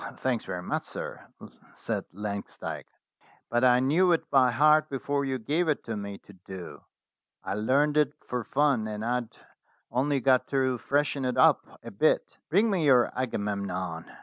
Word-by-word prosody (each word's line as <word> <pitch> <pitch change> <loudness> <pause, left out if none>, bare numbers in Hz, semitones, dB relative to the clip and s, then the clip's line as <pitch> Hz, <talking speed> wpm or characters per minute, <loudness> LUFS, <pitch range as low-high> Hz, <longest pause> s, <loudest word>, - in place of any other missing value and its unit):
' - - -8
"Thanks 125 -3 -2
very 90 -1 -5
much, - - -2
sir," - - -7 0.5
said - - -3
Langsdyke; 100 +1 -6 0.6
"but 120 +1 +1
I 125 -1 +6
knew 160 +8 +3
it 165 - -2
by 130 -2 +5
heart 150 +5 +4
before 140 +1 -2
you 135 -1 -1
gave 150 +9 -1
it 150 - 0
to 115 - -4
me 100 -1 -6
to 100 - -17
do. 90 -5 -10 0.6
I - - -3
learnt 140 +8 +2
it 150 - +3
for 125 -1 -3
fun, 135 -4 +1
and 105 0 -5
I'd 120 -1 -2 0.5
only 135 +4 +1
got 130 0 +3
to 130 -3 0
freshen 145 0 0
it 125 -1 -1
up - - +4 0.2
a - - -8
bit." - - +1
"Bring 205 +8 +3
me 185 -5 +1
your 125 -4 +5
'Agamemnon.' 100 -8 -3
125 Hz, 170 wpm, -28 LUFS, 105-145 Hz, 0.6 s, I